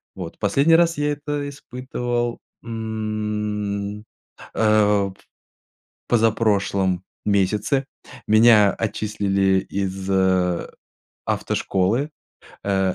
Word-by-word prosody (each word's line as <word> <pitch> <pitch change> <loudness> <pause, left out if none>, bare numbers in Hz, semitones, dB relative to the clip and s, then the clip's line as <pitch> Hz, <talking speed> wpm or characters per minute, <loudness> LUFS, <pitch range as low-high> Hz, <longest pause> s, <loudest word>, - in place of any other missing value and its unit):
Вот 90 -3 -7
последний 140 +10 +4
раз 170 0 +3
я 145 0 +1
это 145 0 -4
испытывал, 125 -3 -3 0.2
м, 105 -2 -3 0.5
э, 110 -1 +4
в 100 -2 +1 0.9
позапрошлом 100 -5 +1 0.2
месяце. 105 +7 +1 0.4
Меня 110 -2 +6
отчислили 100 -3 0
из 95 -1 -3 1.2
автошколы, 110 +10 0 0.5
э, 95 -2 +1
105 Hz, 75 wpm, -22 LUFS, 100-120 Hz, 1.2 s, Меня